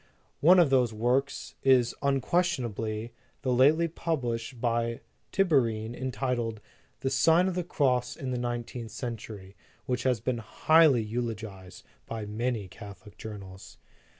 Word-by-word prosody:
"One 180 +5 +7
of 170 -6 +5
those 125 -3 +3
works 125 +5 -1
is, 130 -3 +4
unquestionably, 125 - 0 0.3
that 130 - -1
lately 145 +7 +4
published 125 -7 -3
by 115 0 -1 0.3
Tiberine, 120 - +1
entitled 125 -3 -2 0.4
The 135 - -1
Sign 160 +7 +4
of 190 - -1
the 180 0 -1
Cross 130 -7 0
in 130 -1 -5
the 125 - -2
Nineteenth 120 -1 -4
Cen 120 -1 -4
tury, 100 -3 -10 0.3
which 125 -1 -1
has 125 -3 +1
been 120 +1 -2
highly 145 +2 +4
eulogized 110 -4 -5 0.2
by 110 -2 -5
many 110 0 -2
Catholic 100 +1 -12
journals. 100 -4 -10
120 Hz, 130 wpm, -28 LUFS, 110-135 Hz, 0.4 s, One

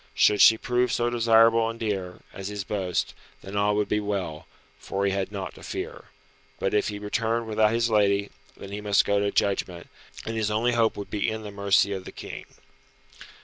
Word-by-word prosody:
Should 105 - +4
she 110 - +8
prove 125 +2 0
so 120 0 0
desirable 115 -1 +4
and 115 0 -7
dear, 95 -5 -3
as 95 -1 -6
his 105 -1 -4
boast, 95 -3 -2 0.3
then 95 +1 -8
all 105 0 +2
would 105 0 0
be 105 - +1
well, 100 -7 -4 0.3
for 100 +1 -2
he 100 - +2
had 95 0 -2
naught 100 -2 -5
to - - -15
fear. - - -6 0.5
But - - -1
if 105 - +2
he 105 - -4
returned 115 +3 -1
without 110 -1 +2
his 115 0 +1
lady, 100 -1 +2 0.3
then 100 - -10
he 105 +1 -5
must 105 -1 +3
go 100 0 +2
to 100 0 +1
judgment, 95 -4 -1 0.4
and 115 - -4
his 110 -1 0
only 110 +3 +1
hope 115 -2 +1
would 100 - -7
be 105 +1 0
in 110 0 -5
the 105 - -7
mercy 100 0 +2
of 95 -1 -6
the - - -8
King. - - -8
105 Hz, 205 wpm, -26 LUFS, 100-115 Hz, 0.5 s, she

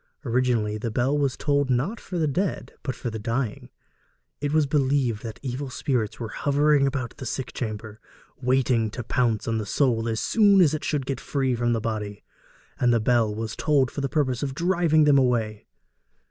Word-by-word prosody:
Originally, 115 -4 +1
the 115 - -2
bell 125 +6 +1
was 140 -3 0
tolled 145 -2 +1
not 135 - 0
for 180 - -6
the 160 -2 +1
dead, 180 +6 -2
but 130 - -3
for 120 - -4
the 110 - -5
dying; 115 +1 -3 0.7
it 145 0 -2
was 155 -1 +3
believed 135 -5 +1
that 115 -2 -7
evil 130 +1 -4
spirits 125 -5 -2
were 115 -2 -4
hovering 145 +2 +2
about 130 -3 -3
the 130 - -7
sick 130 +2 -4
chamber, 110 -2 -5 0.4
waiting 125 -3 +2
to 120 +3 -6
pounce 115 -2 0
on 115 -1 0
the - - -2
soul 115 -2 +1
as 110 -1 -1
soon 205 -3 +4
as 165 -5 +5
it 155 - -3
should 145 -4 -1
get 135 0 -3
free 135 -3 -1
from 120 0 +1
the 115 - 0
body; 105 -2 -4 0.6
and 125 - +3
the 115 - +3
bell 110 -2 +2
was 110 0 -4
tolled 140 -4 +2
for 145 - -4
the 135 - -1
purpose 130 -5 0
of 135 -2 -3
driving 170 -2 +3
them 145 -2 +5
away. 115 -5 0
130 Hz, 195 wpm, -25 LUFS, 115-145 Hz, 0.7 s, as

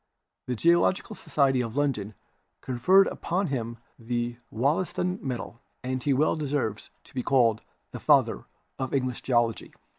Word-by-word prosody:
The 125 - -1
Geological 170 - +2
Society 135 -7 +1
of 115 +2 -5
London 110 -8 -1 0.5
conferred 180 +11 +4
upon 180 +1 -2
him 115 -2 -3 0.2
the 120 0 -2
Wollaston 180 - 0
medal, 120 -2 -5 0.2
and 130 0 -2
he 145 - 0
well 140 +4 +3
deserves 140 -8 -2
to - - -20
be 130 - -2
called 120 -4 +3 0.3
the - - -7
"Father - - +3 0.3
of 130 +1 -2
English 130 -2 -1
Geology." 120 -3 0
130 Hz, 140 wpm, -27 LUFS, 120-150 Hz, 0.5 s, conferred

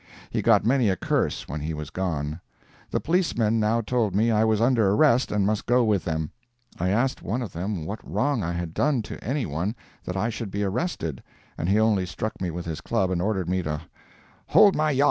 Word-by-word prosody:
He - - 0
got - - +4
many 125 -2 +3
a 95 - +2
curse - - -1
when 75 +3 -4
he 80 +2 -3
was 75 -1 -6
gone. 80 -3 -3 0.5
The - - 0
policemen 120 - +1
now 110 +2 +2
told 110 -4 0
me 115 +3 +3
I 110 0 +3
was 110 -1 +2
under 115 -3 +3
arrest 125 +4 +3
and 105 -2 +1
must 105 +1 -1
go 125 +1 +4
with 105 -4 +1
them. 80 -2 -2 0.5
I 90 +2 +1
asked 120 +7 +1
one 115 +7 -2
of 105 - -7
them 90 -1 -3
what 100 +6 -4
wrong 140 -4 0
I 85 -1 -2
had 85 -1 -4
done 140 - +1
to - - -8
anyone 105 - -2 0.3
that 90 - -3
I 110 +4 0
should 115 -1 -5
be 100 +2 -2
arrested, 95 - -2 0.3
and 85 - -2
he 105 +2 +4
only 105 -4 +2
struck 110 +4 -5
me 90 - -1
with 85 +1 -5
his 80 -2 -4
club 95 -1 0
and 90 -2 0
ordered 95 -2 -1
me 90 +1 0
to 75 -3 -3 0.7
"hold 200 -2 +6
my 155 0 +2
yop." 135 -3 0
105 Hz, 220 wpm, -25 LUFS, 85-115 Hz, 0.7 s, hold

